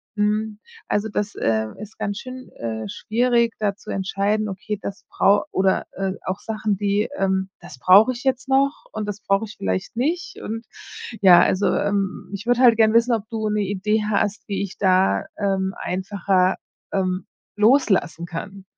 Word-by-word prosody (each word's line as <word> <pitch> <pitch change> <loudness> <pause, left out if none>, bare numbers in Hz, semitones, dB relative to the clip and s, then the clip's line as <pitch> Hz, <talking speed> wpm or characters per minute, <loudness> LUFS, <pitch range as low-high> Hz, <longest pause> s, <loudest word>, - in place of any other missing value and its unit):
mhm, 210 0 0 0.3
also, 205 +1 0
das, 205 0 -3
äh, 110 -1 0
ist 215 0 -10
ganz 200 0 -3
schön, 255 0 -9
äh, 110 -1 -4
schwierig, 235 0 +1
da 205 -2 0
zu - - -9
entscheiden, 200 +2 0
okay, 205 +2 -4
das 200 +3 -7
brau 200 +1 +3
oder, 190 0 +1
äh, 195 0 -2
auch 190 +1 -2
Sachen, 215 -2 -2
die, 205 +1 +1
ähm 190 0 0
das 130 - -12
brauche 195 - +6
ich 245 0 -7
jetzt 260 0 0
noch 275 +2 +2
und 215 -1 -4
das 205 0 -5
brauche 195 +2 +1
ich 215 - -11
vielleicht 95 - -3
nicht 315 +9 -2
und 225 +2 -5 0.6
ja, 180 -3 +8
also, 190 +3 +2
ähm, 200 -1 -1
ich 200 +3 -6
würde 245 0 +2
halt 240 -3 +7
gern 220 -1 +4
wissen, 235 +1 +4
ob 220 -3 0
du 220 -1 -2
'ne 210 0 0
Idee 205 +2 0
hast, 205 0 0
wie 200 - -1
ich 195 - -7
da, 190 -1 +3
ähm, 195 -1 0
einfacher, 190 0 0 0.3
ähm, 185 -1 -1 0.3
loslassen 210 - +3
kann. 190 +3 -7
205 Hz, 175 wpm, -22 LUFS, 190-220 Hz, 0.6 s, ja